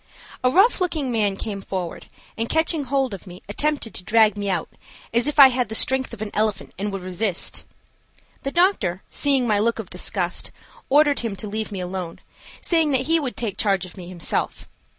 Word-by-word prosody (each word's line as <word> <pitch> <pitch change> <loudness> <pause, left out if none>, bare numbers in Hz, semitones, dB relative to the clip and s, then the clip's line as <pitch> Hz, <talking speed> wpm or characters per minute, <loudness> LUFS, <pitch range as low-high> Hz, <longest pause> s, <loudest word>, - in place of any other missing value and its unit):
A 255 - +5
rough 385 - +4
looking 310 -7 0
man 210 -4 +1
came 200 0 -5
forward, 185 -3 -5 0.3
and 230 +1 -2
catching 320 -2 +1
hold 265 -3 0
of 195 0 -9
me 180 +1 -11
attempted 285 +2 -1
to - - -5
drag 215 0 +4
me 205 -1 -3
out 180 -4 -1 0.5
as 235 +3 +2
if 295 - -2
I 275 -2 +10
had 250 -2 -1
the 220 - -3
strength 265 +3 +3
of 210 - -5
an 210 - -6
elephant 210 -2 -1
and 205 +1 -2
would 195 -2 -5
resist. 185 +1 -1 0.8
The 275 - -2
doctor, 340 - +2
seeing 275 -3 +2
my 210 -3 +2
look 230 +2 +1
of 225 -5 -7
disgust, 180 0 -2 0.4
ordered 290 +1 +4
him 225 -4 -3
to 200 +2 -4
leave 215 +1 -4
me 195 -2 -4
alone, 180 -2 -5 0.4
saying 325 -3 +2
that 260 - +3
he 325 +5 +2
would 270 -5 -4
take 215 -5 -3
charge 195 -3 +1
of 180 - -12
me 180 -3 -9
himself. 175 -3 -2
220 Hz, 200 wpm, -23 LUFS, 195-270 Hz, 0.8 s, I